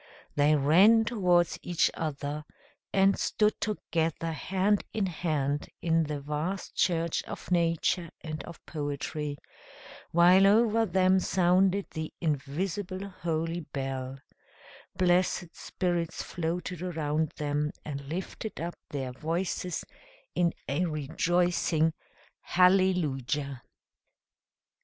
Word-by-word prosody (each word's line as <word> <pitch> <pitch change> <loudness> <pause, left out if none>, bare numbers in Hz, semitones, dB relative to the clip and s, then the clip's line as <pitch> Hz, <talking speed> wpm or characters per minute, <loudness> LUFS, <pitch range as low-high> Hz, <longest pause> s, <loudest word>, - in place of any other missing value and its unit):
They 145 +1 +4
ran 190 +11 +6
towards 180 -7 +2
each 175 -2 +1
other, 150 -1 -3 0.5
and 195 0 +3
stood 210 0 +1
together 165 -6 -1
hand 195 +5 +1
in 215 -3 0
hand 150 -5 -1
in 165 -1 +2
the 150 -1 -3
vast 150 +7 -3
church 170 -2 +1
of 165 - -8
nature 170 0 +1
and 155 -3 -5
of 170 - -12
poetry, 145 0 -4 0.7
while 180 +3 +6
over 225 +1 +4
them 185 +1 +4
sounded 185 +2 +3
the 155 0 -4
invisible 180 +6 -2
holy 165 -2 -2
bell: 135 -3 -4 0.8
blessed 180 -1 +2
spirits 175 -3 -2
floated 175 +1 -3
around 155 -3 -1
them, 150 0 0 0.2
and 140 -2 -6
lifted 190 +5 -5
up 170 +1 -3 0.2
their 135 -3 -3
voices 170 +5 -2 0.5
in 175 -1 +2 0.2
a 145 +6 0
rejoicing 165 +1 +1 0.5
hallelujah! 155 -8 +2
170 Hz, 100 wpm, -29 LUFS, 150-185 Hz, 0.8 s, ran